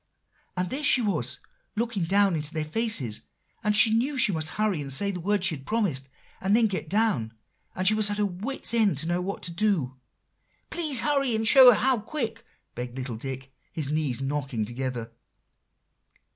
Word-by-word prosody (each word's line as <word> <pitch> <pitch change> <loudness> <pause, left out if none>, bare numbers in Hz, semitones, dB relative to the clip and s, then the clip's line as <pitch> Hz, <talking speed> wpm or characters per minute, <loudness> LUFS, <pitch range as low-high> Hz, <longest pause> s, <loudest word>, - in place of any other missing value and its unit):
"And 180 0 -2
there 275 - -3
she 270 - +6
was, 205 -2 -1 0.4
looking 225 -5 -2
down 195 +1 +2
into 155 +1 -5
their 155 -1 -2
faces, 155 - 0 0.4
and 210 -1 +2
she 220 - +5
knew 260 +5 0
she 230 - +4
must 160 -2 -3
hurry 210 -5 -1
and 140 -1 -5
say 200 +9 +1
the 180 - -6
words 200 +2 0
she 160 - +1
had 135 - -12
promised, 175 -13 -1 0.3
and 195 +2 +2
then 230 0 +4
get 190 -6 -3
down; 195 - 0 0.4
and 185 0 +1
she 215 - +6
was 215 -1 +2
at 205 - -3
her 210 - +1
wits' 205 +7 -1
end 215 - +2
to 155 - -1
know 175 +1 -1
what 195 +2 -5
to 175 - -2
do." 170 -9 -1 0.7
"Please 300 -8 +5
hurry, 275 -5 +1
and 220 0 0
show 260 +1 +9
her 220 - +2
how 260 -2 +2
quick," 225 -1 -4 0.3
begged 125 +1 -7
little 130 -3 -5
Dick, 135 +3 -7 0.2
his 150 -4 -2
knees 150 -5 -1
knocking 135 -5 -3
together. 120 -1 -5
190 Hz, 190 wpm, -26 LUFS, 140-220 Hz, 0.7 s, show